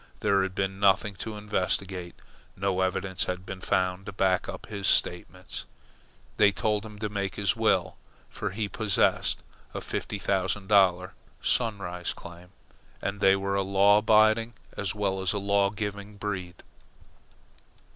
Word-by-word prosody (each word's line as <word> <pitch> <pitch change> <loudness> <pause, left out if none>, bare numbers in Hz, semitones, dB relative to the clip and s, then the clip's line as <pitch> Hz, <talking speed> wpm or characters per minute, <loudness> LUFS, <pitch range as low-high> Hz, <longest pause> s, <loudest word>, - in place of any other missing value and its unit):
There 100 -1 +3
had 95 -1 -2
been 95 0 -1
nothing 100 +1 +3
to 110 +4 -5
investigate. 95 -3 -2 0.4
No 95 -1 0
evidence 95 0 0
had 90 0 -4
been 95 -1 -7
found 95 -1 0
to - - -4
back 95 -1 +1
up - - -7
his 100 -2 -3
statements. - - 0 0.7
They 105 -1 +6
told 105 +2 0
him 105 -1 -10
to 105 0 -2
make 100 -1 -3
his 100 -3 +1
will, - - +1 0.3
for 105 - -4
he 105 +2 -2
possessed 105 -1 +1 0.3
a - - -1
fifty - - -4
thousand 95 0 -1
dollar 95 -2 +4 0.3
Sunrise 95 -7 -1
claim, 85 +1 -11 0.5
and 100 +1 -3
they 95 -1 +5
were 100 0 -2
a 100 - +2
law 100 +2 +5
abiding 110 +2 +4 0.2
as 100 -1 -2
well 95 -2 -1
as 95 -2 0
a - - -1
law 100 0 +2
giving 100 0 -5
breed. 95 -4 -5
100 Hz, 150 wpm, -28 LUFS, 95-105 Hz, 0.7 s, They